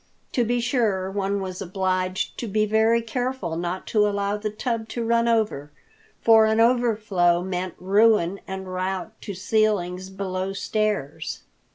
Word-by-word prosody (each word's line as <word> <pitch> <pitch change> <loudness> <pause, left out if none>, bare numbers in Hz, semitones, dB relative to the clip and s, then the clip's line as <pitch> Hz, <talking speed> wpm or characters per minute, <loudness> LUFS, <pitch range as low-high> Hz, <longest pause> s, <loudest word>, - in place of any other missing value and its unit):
To 245 - +1
be 240 +1 0
sure, 220 -7 0
one 200 0 -1
was 185 0 -5
obliged 185 0 -1
to 235 - -3
be 215 +1 +1
very 220 +2 +3
careful 245 -7 -3
not 175 +2 -3
to 210 -1 +4
allow 200 0 -1
the 210 +1 -3
tub 225 +1 -3
to 235 -1 -3
run 235 0 +2
over, 215 -11 0 0.5
for 225 -1 +6
an 220 +1 +2
overflow 215 -8 +3
meant 185 -1 -3
ruin 200 -1 +3
and 190 -1 -6
rout 185 +2 -2
to 200 - -6
ceilings 190 -2 0
below 190 0 -3
stairs. 210 -7 -2
200 Hz, 150 wpm, -24 LUFS, 185-225 Hz, 0.5 s, for